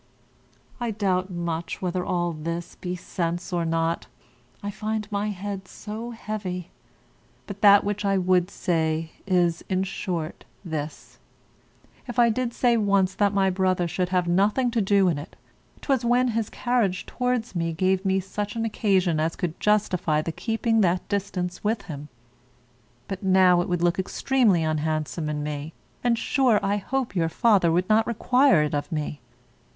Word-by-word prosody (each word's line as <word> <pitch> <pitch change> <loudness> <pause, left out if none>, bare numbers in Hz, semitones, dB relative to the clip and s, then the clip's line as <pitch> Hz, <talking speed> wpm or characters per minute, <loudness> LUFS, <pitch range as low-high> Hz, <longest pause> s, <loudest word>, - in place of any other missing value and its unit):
I 240 -1 -1
doubt 195 -3 0
much 170 -2 -3
whether 180 -1 -2
all 175 -1 0
this 165 +2 -5
be 180 0 -5
sense 175 0 -3
or 170 -1 0
not; 165 0 -1 0.6
I 205 - -3
find 215 +1 -3
my 205 +1 -1
head 195 -1 -5
so 220 +5 -7
heavy. 205 -6 -5 0.7
But 200 0 -8
that 200 -1 +7
which 205 +1 -2
I 195 -1 +2
would 180 -1 +2
say 160 -4 -1 0.2
is, 175 -3 +2
in 185 -1 +1
short, 180 -4 -4 0.2
this: 155 -2 -6 0.9
if 245 - -6
I 240 -1 +6
did 245 +1 -1
say 240 0 +2
once 200 -3 +2
that 200 +1 +2
my 195 -2 +2
brother 185 -1 +1
should 180 +2 -1
have 180 -1 +1
nothing 210 +8 +2
to 230 -1 +1
do 195 -1 +3
in't, 150 -3 -3 0.5
'twas 265 -4 +1
when 245 +1 +3
his 225 -2 -1
carriage 230 -7 0
towards 250 -3 -1
me 165 -1 0
gave 185 +3 +1
me 190 -1 +2
such 205 +3 -4
an 225 0 -1
occasion 190 -7 +1
as 160 +2 0
could 175 -4 -4
justify 185 -7 +2
the 160 +2 -2
keeping 225 +3 0
that 180 -1 +1
distance 185 -3 -3
with 210 0 0
him; 145 -2 -7 1.0
but 195 -2 -5
now 185 -2 +5
it 180 - -4
would 175 -1 0
look 175 +1 +2
extremely 210 -2 +2
unhandsome 155 0 -1
in 150 -1 -2
me, 150 +1 -5 0.3
and, 240 -1 +2
sure, 250 -4 +2
I 200 +1 +1
hope 245 +1 -2
your 165 -2 +1
father 195 -3 +3
would 180 +2 +1
not 220 +1 +3
require 250 - +4
it 150 - -2
of 145 +4 -2
me. 150 -2 -3
190 Hz, 165 wpm, -25 LUFS, 170-215 Hz, 1.0 s, that